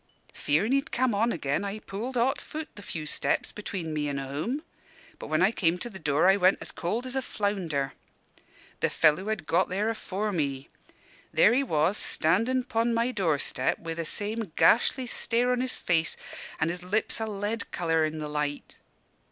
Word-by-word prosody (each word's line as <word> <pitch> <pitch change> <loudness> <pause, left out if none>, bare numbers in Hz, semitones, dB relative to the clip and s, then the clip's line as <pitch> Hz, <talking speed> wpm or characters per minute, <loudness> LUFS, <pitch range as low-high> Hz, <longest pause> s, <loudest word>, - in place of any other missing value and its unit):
Fearin' 170 - +1
he'd 275 +3 +1
come 255 -2 +2
on 225 +4 +2
again, 145 0 -1
I 200 +1 -3
pulled 215 +5 -5
hot 260 +4 +2
foot 310 0 -6
the 205 - -10
few 160 -5 -5
steps 150 - 0
between 185 -6 -5
me 150 -1 -1
an' 140 - -2
home. 150 - -3 0.6
But - - -7
when 155 +3 +2
I 195 - +5
came 175 -5 +1
to 235 +6 -4
the 190 - -9
door, 150 +1 +2
I 195 +1 +6
went 185 0 +4 0.2
cold 220 +9 -2
as 255 0 -4
a 265 - +1
flounder. 180 - -1 0.9
"The - - +2
fellow 160 +5 +3
had 215 -6 -2
got 175 +4 +2
there 200 +4 0
afore 210 -1 -3
me. 140 -6 -2 0.6
There 210 - +5
he 260 - +3
was, 175 - +1
standin' 230 +11 +1
'pon 230 0 0
my 235 +2 +1
door 170 - +1
step 130 -1 0
wi' 165 0 -5
the 165 0 -3
same 210 +3 -3
gashly 250 +3 +4
stare 245 +1 +1
on 250 0 +1
his 255 0 -2
face, 165 -2 0 0.4
and 160 +2 +1
his 180 +1 -5
lips 200 +6 -1
a 220 - -2
lead 205 +1 -3
colour 165 -2 +1
in 155 0 -1
the 155 -1 -4
light. 150 -1 -3
195 Hz, 190 wpm, -28 LUFS, 160-230 Hz, 0.9 s, I